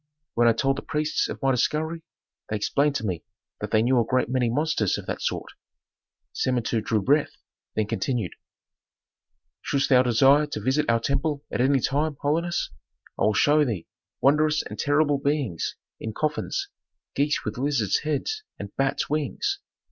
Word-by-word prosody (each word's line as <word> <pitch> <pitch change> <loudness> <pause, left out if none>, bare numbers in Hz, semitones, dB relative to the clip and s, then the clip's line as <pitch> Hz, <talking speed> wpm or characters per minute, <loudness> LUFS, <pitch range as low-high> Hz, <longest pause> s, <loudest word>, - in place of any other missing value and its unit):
When 120 0 +4
I 115 - +6
told 135 +4 +1
the - - -3
priests 155 0 -1
of - - -5
my 135 - +4
discovery 155 +6 0 0.5
they 110 - -1
explained 140 +7 +1
to 110 - -2
me 90 -5 -2 0.4
that 105 - -4
they 110 +1 +3
knew 125 +1 +3
a - - +4
great 130 +2 0
many 125 -2 +1
monsters 125 - +1
of - - -7
that - - -4
sort." - - -2 0.8
Samentu 120 -3 0
drew 110 -2 0
breath, 145 +5 +2 0.4
then 110 - +1
continued, 115 - -2 1.3
"Shouldst 140 -1 0
thou 125 -2 +7
desire 135 +5 +5
to 145 - -4
visit 130 +7 +1
our 115 0 +4
temple 140 +4 -1
at - - 0
any 135 +1 +4
time, 145 +3 0
holiness, 170 +4 0 0.5
I - - +3
will 105 - +2
show 150 +6 +4
thee 110 - -2 0.4
wondrous 150 +2 +3
and - - -8
terrible 145 -1 +2
beings 140 - -1 0.2
in 110 - -5
coffins: 155 - -2 0.4
geese 145 +1 0
with 110 +2 -4
lizards' 135 -7 +1
heads 155 - -2 0.2
and 100 - -8
bats' 135 0 0
wings. 275 - -1
135 Hz, 165 wpm, -25 LUFS, 115-150 Hz, 1.3 s, thou